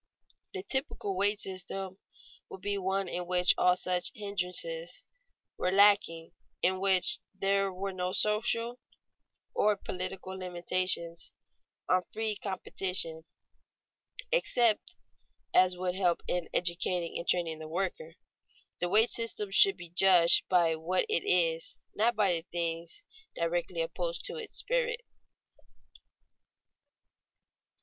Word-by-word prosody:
The 385 Hz, -, -4 dB
typical 265 Hz, -, -2 dB
wage 205 Hz, +2 st, +1 dB
system 190 Hz, 0 st, -6 dB, 0.5 s
would 190 Hz, -, -10 dB
be 205 Hz, 0 st, -2 dB
one 190 Hz, 0 st, -1 dB
in 175 Hz, 0 st, -4 dB
which 180 Hz, 0 st, +4 dB
all 180 Hz, 0 st, +4 dB
such 180 Hz, -1 st, 0 dB
hindrances 210 Hz, -, -3 dB, 0.6 s
were 180 Hz, -, +1 dB
lacking, 195 Hz, -5 st, +4 dB, 0.3 s
in 185 Hz, +1 st, +2 dB
which 190 Hz, -2 st, +3 dB, 0.2 s
there 195 Hz, 0 st, +1 dB
were 190 Hz, +1 st, -4 dB
no 180 Hz, 0 st, -2 dB
social 230 Hz, +4 st, 0 dB, 0.7 s
or 210 Hz, 0 st, +3 dB
political 185 Hz, 0 st, -6 dB
limitations 180 Hz, -2 st, -1 dB, 0.6 s
on 185 Hz, 0 st, +3 dB
free 220 Hz, -1 st, -2 dB
competition 185 Hz, -4 st, -3 dB, 1.1 s
except 250 Hz, -, +2 dB
such 355 Hz, -, -19 dB, 0.6 s
as 185 Hz, -1 st, +4 dB
would 180 Hz, 0 st, -2 dB
help 180 Hz, -2 st, +1 dB
in 175 Hz, -2 st, -2 dB
educating 175 Hz, 0 st, -1 dB
and 170 Hz, -, -7 dB
training 165 Hz, -3 st, 0 dB
the 155 Hz, -, -7 dB
worker. 195 Hz, -, -4 dB, 0.6 s
The 175 Hz, -, -1 dB
wage 220 Hz, +5 st, +4 dB
system 225 Hz, -3 st, -2 dB
should 195 Hz, 0 st, +5 dB
be 175 Hz, -2 st, -10 dB
judged 175 Hz, -1 st, +5 dB
by 170 Hz, -3 st, +3 dB
what 175 Hz, -, 0 dB
it 435 Hz, -, +1 dB
is, -, -, +1 dB, 0.2 s
not 235 Hz, +3 st, +2 dB
by 190 Hz, -6 st, +2 dB
things 170 Hz, -, -4 dB, 0.3 s
directly 170 Hz, 0 st, -1 dB
opposed 170 Hz, +1 st, -4 dB
to 475 Hz, -, -5 dB
its 455 Hz, -2 st, -6 dB
spirit. -, -, 0 dB
190 Hz, 120 wpm, -30 LUFS, 175-210 Hz, 1.1 s, should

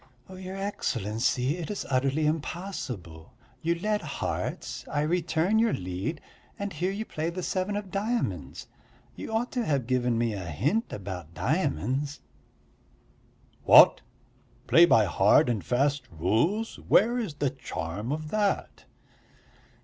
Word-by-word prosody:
"Your 185 Hz, +1 st, -7 dB
Excellency, 125 Hz, -, -1 dB
it's 190 Hz, +4 st, -4 dB
utterly 135 Hz, +3 st, +1 dB
impossible. 145 Hz, -, -4 dB, 0.3 s
You 170 Hz, +1 st, +1 dB
led 210 Hz, +4 st, -1 dB
hearts, 150 Hz, -3 st, -4 dB
I 145 Hz, -, +1 dB
return 175 Hz, +5 st, +1 dB
your 230 Hz, -1 st, +3 dB
lead, 95 Hz, -, -4 dB, 0.4 s
and 200 Hz, -1 st, -4 dB
here 175 Hz, +5 st, -1 dB
you 205 Hz, +3 st, -3 dB
play 160 Hz, -3 st, -3 dB
the 180 Hz, +1 st, -5 dB
seven 190 Hz, +3 st, -1 dB
of 205 Hz, -2 st, -5 dB
diamonds. 195 Hz, -, -2 dB, 0.5 s
You -, -, -7 dB
ought 225 Hz, +3 st, -1 dB
to 245 Hz, -, -1 dB
have 140 Hz, -, 0 dB
given 125 Hz, -1 st, +1 dB
me 115 Hz, -1 st, 0 dB
a 100 Hz, -, -4 dB
hint 130 Hz, -, -1 dB
about 90 Hz, -4 st, -7 dB
diamonds." 130 Hz, -, -1 dB, 1.4 s
"What, -, -, +8 dB, 0.6 s
play 170 Hz, +1 st, +7 dB
by 110 Hz, -9 st, +5 dB
hard 100 Hz, +5 st, +4 dB
and 110 Hz, -5 st, -1 dB
fast 135 Hz, 0 st, 0 dB
rules? 115 Hz, -, 0 dB
Where 235 Hz, +4 st, +3 dB
is 200 Hz, -11 st, -4 dB
the 145 Hz, -2 st, 0 dB
charm 105 Hz, -3 st, -5 dB
of 155 Hz, 0 st, -4 dB
that?" 205 Hz, -2 st, -1 dB
150 Hz, 130 wpm, -27 LUFS, -, 1.4 s, What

